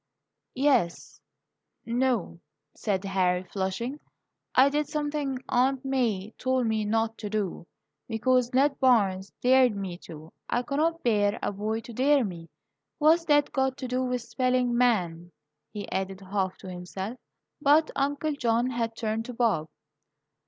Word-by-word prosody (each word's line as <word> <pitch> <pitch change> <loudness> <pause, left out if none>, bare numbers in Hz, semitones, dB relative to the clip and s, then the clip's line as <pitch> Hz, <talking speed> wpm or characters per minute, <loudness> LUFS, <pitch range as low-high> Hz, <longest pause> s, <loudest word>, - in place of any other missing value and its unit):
"Yes 255 -10 +1 0.6
n 235 +2 -1
o," 240 -10 0 0.3
said 195 -3 -2
Harry, 185 -2 +1
flushing. 195 +9 -3 0.6
"I 265 +2 +7
did 295 +1 0
something 295 -3 -2
Aunt 260 +2 +1
May 225 -7 0
told 260 -1 +1
me 220 -1 0
not 225 +1 0
to 210 - -5
do, 200 -5 -3 0.4
because 245 +2 +1
Ned 275 +2 +2
Barnes 200 -7 +3
dared 255 -2 +5
me 190 -3 -5
to. 160 -2 -12 0.2
I 245 - 0
cannot 315 +6 0
bear 205 -3 +2
a - - 0
boy 215 +3 -2
to 235 - -10
dare 275 +2 +3
me. 170 -4 -7 0.5
What's 320 +3 +4
that 290 -2 +3
got 265 -1 0
to 260 - -5
do 250 +1 -1
with 250 -2 -2
spelling 250 +1 +1
'man'?" 180 -9 +1 0.4
he 205 -2 -6
added, 190 0 -3
half 190 -1 -2
to - - -9
himself. 190 +6 -6 0.4
But 295 +3 +4
Uncle 285 +2 0
John 240 -2 +1
had 230 -2 -2
turned 225 0 -2
to 250 - -7
Bob. 225 -10 +1
235 Hz, 145 wpm, -27 LUFS, 200-260 Hz, 0.6 s, I